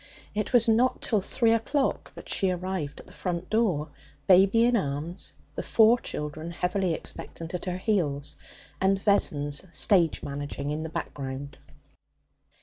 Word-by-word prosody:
It 210 0 -2
was 245 -2 +5
not 235 +3 +3
till 215 -4 +1
three 230 +3 +1
o'clock 265 +5 0
that - - -11
she 195 - +1
arrived 180 -5 -3
at - - -12
the - - -16
front 180 -1 -4
door, 185 -10 +1 0.4
baby 195 +5 +6
in 245 0 +3
arms, 165 -1 -2 0.2
the - - -3
four 225 +2 +5
children, 150 -1 -5
heavily 180 0 0
expectant, 165 +1 -6
at 180 - -4
her 180 -1 -2
heels, 160 -9 0 0.5
and 190 0 +3
Vessons 145 -8 +1
stage 170 -2 +3
managing 145 0 -4
in 150 +1 -2
the 160 - -4
background. 140 -2 -6
180 Hz, 145 wpm, -27 LUFS, 150-215 Hz, 0.5 s, baby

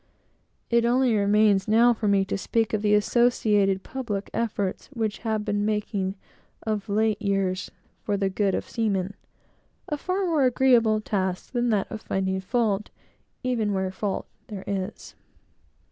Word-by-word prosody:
It 235 0 +4
only 245 0 +3
remains 205 -1 +3
for 230 0 +3
me 200 -1 +4
now - - +2
to 190 - -3
speak 225 +2 0
of 215 - +1
the 210 0 +4
associated 210 -3 +2
public 220 -7 -4
efforts 205 -4 -2
which 220 -3 -2
have 220 -2 -2
been 205 0 0
making 205 -2 -1 0.5
of 215 -1 -2
late 215 0 +1
years 195 -1 0 0.3
for 205 -1 -1
the 195 -1 +1
good 195 0 0
of - - -3
seamen: 200 -4 -1 0.7
a 295 - -2
far 370 +5 -1
more 315 -6 +2
agreeable 235 -4 +4
task 190 -3 -2
than 245 -1 0
that 205 -3 +2
of 215 - -5
finding 190 0 -1
fault, 210 -1 0 0.5
even 230 -5 0
where 190 -1 -1
fault 195 +1 -3 0.2
there 200 -3 -7
is. 195 +1 -4
210 Hz, 150 wpm, -25 LUFS, 195-230 Hz, 0.7 s, It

